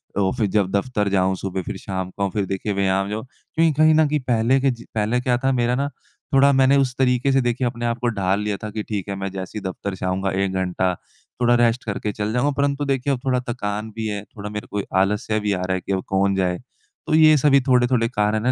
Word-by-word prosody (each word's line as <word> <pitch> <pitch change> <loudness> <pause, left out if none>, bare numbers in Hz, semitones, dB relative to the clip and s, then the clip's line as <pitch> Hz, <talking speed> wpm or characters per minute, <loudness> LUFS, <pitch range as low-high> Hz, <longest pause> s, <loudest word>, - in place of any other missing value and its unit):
तो 100 -1 +2
ऑफ़िस 110 -2 -1
जब 100 -2 +2
दफ़्तर 105 0 0
जाऊँ 95 -1 +2
सुबह 95 0 -4
फ़िर 95 - -5
शाम 95 -1 -4
को 100 -1 0
फ़िर 100 +1 -1
देखिए 95 +2 -3
व्यायाम 95 0 +1
जाऊँ। 110 +3 -4
क्योंकि 160 +4 -1
कहीं 155 0 +6
न 155 -1 +4
कहीं 150 +1 0
पहले 120 +2 +3
के 135 - +3
ज 120 -1 -9
पहले 110 +3 +1
क्या 125 -1 +1
था 135 +2 0
मेरा 120 -1 +1
ना 140 +2 -1 0.4
थोड़ा 140 +1 +6
मैंने 135 +1 +4
उस 130 -2 +1
तरीके 125 +1 +2
से 135 - +3
देखिए 120 +1 0
अपने 120 0 -4
आप 115 0 0
को 120 - -1
ढाल 100 -3 0
लिया 105 -1 -2
था 110 - -3
कि 110 0 -4
ठीक 105 -4 -3
है 100 - -2
मैं 95 0 -4
जैसे 95 +2 -6
ही - - -13
दफ़्तर 95 +1 -5
से 90 - -5
आऊँगा 95 +1 -1
1 95 - -2
घंटा 95 0 0 0.5
थोड़ा 120 0 +4
रेस्ट 120 +1 +2
करके 105 -1 -2
चल 105 +1 -3
जाऊँगा। 130 +4 +2
परंतु 140 0 0
देखिए 135 0 0
अब 130 - -3
थोड़ा 130 -1 +2
थकान 105 -2 -3
भी 110 -1 -3
है 105 -1 -3
थोड़ा 105 -1 -8
मेरे 105 0 -6
को 105 - -1 0.2
आलस्य 105 +3 0
भी 105 -1 0
आ 90 - -2
रहा 95 +1 -1
है 95 - -3
कि - - -6
अब 95 - -1
कौन 95 0 +1
जाए? 90 -2 0 0.5
तो - - 0
ये 155 -1 +7
सभी 140 -1 +4
थोड़े-थोड़े 125 -2 +2
कारण 105 -2 0
है 130 - +4
110 Hz, 255 wpm, -22 LUFS, 100-125 Hz, 0.5 s, ये